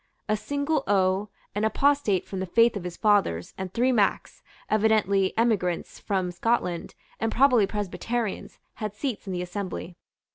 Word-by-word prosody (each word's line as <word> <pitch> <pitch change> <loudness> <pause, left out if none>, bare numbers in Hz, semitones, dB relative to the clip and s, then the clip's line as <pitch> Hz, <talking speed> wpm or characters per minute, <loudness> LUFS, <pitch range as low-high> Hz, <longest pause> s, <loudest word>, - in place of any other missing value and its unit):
A 215 - +2
single 285 +5 -1
O, 195 +1 +2 0.2
an 210 - -1
apostate 225 -4 +2
from 190 - -5
the 190 - -3
faith 230 +5 +4
of 190 -3 -5
his 175 -1 -6
fathers, 200 - +2
and 190 -1 -5
three 245 +5 +2
Macs, 210 -5 0 0.3
evidently 210 -3 +2
emigrants 205 -7 0
from 190 -3 -1
Scotland, 180 -3 -1 0.2
and 225 0 0
probably 250 -5 +4
Presbyterians, 210 +2 -3 0.2
had 210 -2 -4
seats 235 -3 -4
in 190 - -3
the 180 0 -2
assembly. 180 -1 -5
205 Hz, 150 wpm, -26 LUFS, 185-230 Hz, 0.3 s, faith